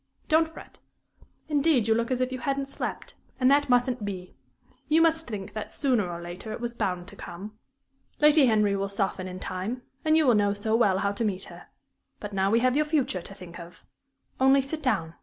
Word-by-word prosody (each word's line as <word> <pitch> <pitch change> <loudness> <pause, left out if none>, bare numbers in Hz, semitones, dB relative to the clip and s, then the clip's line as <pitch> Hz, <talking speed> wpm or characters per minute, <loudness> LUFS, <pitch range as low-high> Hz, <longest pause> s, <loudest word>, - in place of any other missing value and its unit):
Don't 320 0 +4
fret. 320 - -13 0.7
Indeed, 290 -6 +2
you 225 - +4
look 230 +1 0
as 255 -1 0
if 255 0 0
you 260 - -4
hadn't 275 +2 -1
slept, 275 - -5 0.3
and 255 +1 +4
that 285 -1 +3
mustn't 245 -1 +2
be. 185 -3 -6 0.5
You 315 +1 +4
must 325 0 +3
think 205 -5 -6
that, 215 - -5
sooner 245 -10 +1
or 170 - -5
later, 175 +5 -7
it - - -5
was 235 0 -3
bound 185 -6 -2
to - - -13
come. 210 +5 -9 0.6
Lady 300 -2 +6
Henry 210 -3 +3
will 195 0 -2
soften 195 -1 -2
in 185 0 -7
time, 195 +8 -4 0.2
and 315 0 +4
you 315 - +4
will 250 - +5
know 205 -1 +3
so 220 +2 -1
well 205 -5 +3
how 200 +1 0
to 205 +3 -3
meet 195 -3 -1
her. - - -12 0.5
But 210 -1 -7
now 195 0 +1
we 230 +3 +3
have 255 +1 +2
your 305 +1 +3
future 275 - 0
to 195 - -10
think 175 -2 -11
of. 170 +1 -12 0.5
Only 270 +1 +5
sit 305 +4 -5
down. 165 - 0
225 Hz, 215 wpm, -27 LUFS, 195-275 Hz, 0.7 s, Lady